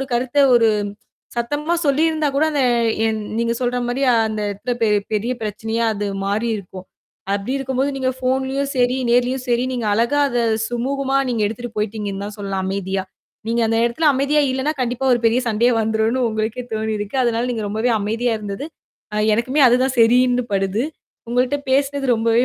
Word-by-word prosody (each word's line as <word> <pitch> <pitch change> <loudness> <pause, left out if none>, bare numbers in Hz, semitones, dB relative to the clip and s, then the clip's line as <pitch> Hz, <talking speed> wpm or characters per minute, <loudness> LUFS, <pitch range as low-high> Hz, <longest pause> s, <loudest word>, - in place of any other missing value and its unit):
ஒரு 270 - -3
கருத்த 255 +3 -1 0.2
ஒரு 230 -1 +4 0.7
சத்தமா 290 +8 -1
சொல்லியிருந்தாகூட 300 0 +2
அத 285 - +1 0.5
என் 220 -1 -1 0.2
நீங்கச் 235 +1 -1
சொல்றமாரி 245 +1 -1 0.3
அந்த 215 -1 -3
இடத்துல 205 +5 -4
பெ- 225 - +4 0.2
பெரிய 215 +4 0
பிரச்சனையா 220 +2 -2
அது 205 0 -3 0.2
மாறி 210 +4 0
இருக்கும். 185 -1 -9 0.5
அப்பிடி 205 +6 -2
இருக்கும்போது 265 +1 -1
நீங்கப் 260 -1 -2
ஃபோன்லயும் 265 +2 -1
சரி, 250 0 +2
நேர்லயும் 250 +2 +2
சரி 240 0 +2
நீங்க 240 -3 -2
அழகா 235 +7 +2
அத 245 -2 -1 0.3
சுமூகமா 270 +3 -1
நீங்க 230 -3 0
எடுத்திட்டு 225 +2 -6
போயிட்டீங்கன்னுதான் 210 -1 -3
சொல்லலாம் 195 -1 -3
அமைதியா. 190 0 -2 0.4
நீங்க 235 0 +1
அந்த 225 0 +1
இடத்துல 240 +7 +2
அமைதியா 280 +3 +2
இல்லன்னா, 265 +3 0
கண்டிப்பா 250 +2 -1
ஒரு 240 - -1
பெரிய 230 +2 +3
சண்டையா 235 +3 +2
வந்துரும்னு 220 +3 0
உங்களுக்கே 220 +3 -3
தோணி 220 0 -1
இருக்கு. 205 +5 -4
அதனால 235 +1 0
நீங்க 220 -2 -3
ரொம்பவே 220 +4 0
அமைதியா 225 +3 0
இருந்தது. 205 +7 -5 0.5
ஆ - - -2 0.2
எனக்குமே 255 +6 +1
அதுதான் 255 +2 +2
சரின்னு 245 +2 +4
படுது. 195 +5 0 0.5
உங்கள்ட்ட 250 +4 +1
பேசுனது 275 -1 +1
ரொம்பவே 230 +2 +2
240 Hz, 160 wpm, -20 LUFS, 220-260 Hz, 0.7 s, ஒரு